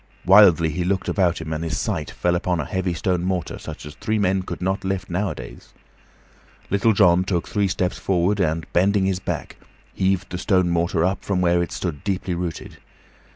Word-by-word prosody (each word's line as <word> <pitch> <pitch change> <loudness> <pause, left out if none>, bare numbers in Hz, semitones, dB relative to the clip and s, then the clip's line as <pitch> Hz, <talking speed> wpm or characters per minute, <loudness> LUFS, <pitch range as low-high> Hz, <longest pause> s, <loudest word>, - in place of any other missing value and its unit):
Wildly 90 -4 +6
he 85 +4 -2
looked 95 +1 -1
about 90 -4 +1
him, 80 -1 -5
and 80 +1 -3
his 80 -4 -2
sight - - -2
fell 90 - 0
upon 90 0 0
a 75 - -2
heavy 95 +2 -2
stone 90 +1 -1
mortar, 90 -3 -2
such - - -8
as 75 - -8
three 110 +6 -2
men 95 -2 +1
could 90 - -6
not 95 +2 -1
lift 95 -1 -3
nowadays. 75 -11 -5 1.0
Little 100 +3 +3
John 90 -3 +4
took 90 -3 -2
three 100 -2 0
steps 90 -1 -2
forward, 95 +2 +1
and, 80 -3 0
bending 95 +2 +3
his 95 -1 0
back, - - -5 0.4
heaved 95 0 0
the 90 - -4
stone 90 -2 +2
mortar 85 0 +1
up 95 +1 -1
from 100 -2 -1
where 85 -1 +3
it 85 - -3
stood 80 -6 -4
deeply 95 -2 -2
rooted. 85 -2 -5
90 Hz, 195 wpm, -22 LUFS, 85-95 Hz, 1.0 s, Wildly